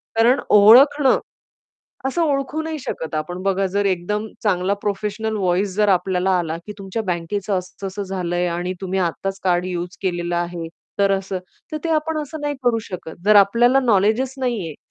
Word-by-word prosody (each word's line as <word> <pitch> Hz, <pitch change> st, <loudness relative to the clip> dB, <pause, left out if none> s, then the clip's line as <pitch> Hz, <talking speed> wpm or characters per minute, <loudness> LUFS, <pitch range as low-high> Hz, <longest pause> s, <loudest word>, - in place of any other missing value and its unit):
कारण 235 Hz, +4 st, +4 dB
ओळखणं 260 Hz, +7 st, +7 dB, 0.9 s
असं 305 Hz, +6 st, -1 dB
ओळखू 280 Hz, +1 st, -1 dB
नाही 315 Hz, -1 st, -4 dB
शकत 160 Hz, -10 st, -5 dB
आपण. 175 Hz, +4 st, -4 dB
बघा, 195 Hz, 0 st, +1 dB
जर 200 Hz, +2 st, -1 dB
एकदम 200 Hz, +3 st, -1 dB, 0.2 s
चांगला 195 Hz, -2 st, +1 dB
प्रोफेशनल 210 Hz, +2 st, -2 dB
व्हॉईस 185 Hz, +1 st, 0 dB
जर 210 Hz, 0 st, +3 dB
आपल्याला 185 Hz, 0 st, +1 dB
आला, 165 Hz, -1 st, -3 dB
की 210 Hz, -, -6 dB
तुमच्या 195 Hz, +3 st, -4 dB
बँकेचं 185 Hz, +4 st, -2 dB
असं-असं 190 Hz, +2 st, -6 dB
झालं 185 Hz, -2 st, -3 dB
आहे 175 Hz, 0 st, +1 dB
आणि 175 Hz, +2 st, -2 dB
तुम्ही 190 Hz, 0 st, -1 dB
आत्ताच 190 Hz, +2 st, -2 dB
कार्ड 180 Hz, -1 st, +2 dB
युज 180 Hz, -1 st, -4 dB
केलेलं 175 Hz, -2 st, -1 dB
आहे, 175 Hz, -1 st, -3 dB, 0.3 s
तर 200 Hz, 0 st, +4 dB
असं. 195 Hz, -1 st, -2 dB, 0.3 s
तर 310 Hz, -, -2 dB
ते 335 Hz, -, -1 dB
आपण 315 Hz, 0 st, 0 dB
असं 300 Hz, +1 st, -7 dB
नाही 290 Hz, 0 st, -2 dB
करू 235 Hz, -2 st, +2 dB
शकत. 175 Hz, -3 st, -7 dB
जर 215 Hz, 0 st, +6 dB
आपल्याला 235 Hz, +6 st, +5 dB
नॉलेजच 230 Hz, +2 st, +2 dB
नाही 240 Hz, -8 st, -1 dB
आहे 155 Hz, -, -8 dB
195 Hz, 175 wpm, -21 LUFS, 180-230 Hz, 0.9 s, ओळखणं